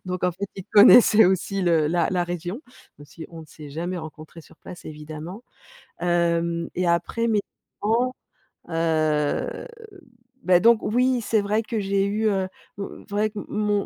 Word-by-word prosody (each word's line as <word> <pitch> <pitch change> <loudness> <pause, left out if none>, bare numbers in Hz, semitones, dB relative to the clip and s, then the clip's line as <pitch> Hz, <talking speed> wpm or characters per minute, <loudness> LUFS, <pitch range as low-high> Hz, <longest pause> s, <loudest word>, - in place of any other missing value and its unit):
Donc 180 -1 -3
en 180 - +1
fait, 200 +3 -5
il 190 - -7
connaissait 215 +1 +8
aussi 190 +1 0
le 165 -3 +2
la 170 +2 +1
la 180 -2 0
région, 175 - -5 0.4
même 145 - -13
si 160 +4 -11
on 165 - -10
ne 160 - -13
s'est 150 -1 -12
jamais 175 +4 -4
rencontrés 155 +1 -10
sur 160 - -20
place, 175 - -12
évidemment. 155 +7 -8 0.6
Hem 170 -1 0
et 180 0 0
après, 200 +7 0
mes 215 -3 +2 0.4
parents, 240 +5 +1 0.5
heu, 155 - 0 0.8
beh, 180 -1 +4
donc, 230 0 +5
oui, 250 +2 +1
c'est 220 0 +1
vrai 210 +2 0
que 225 0 -3
j'ai 195 0 0
eu, 215 +2 0
heu, 190 -2 0 0.3
mmh, 200 - -4 0.2
vrai, 210 +1 0
qu 210 - -12
mon 210 -1 0
180 Hz, 170 wpm, -23 LUFS, 165-210 Hz, 0.8 s, connaissait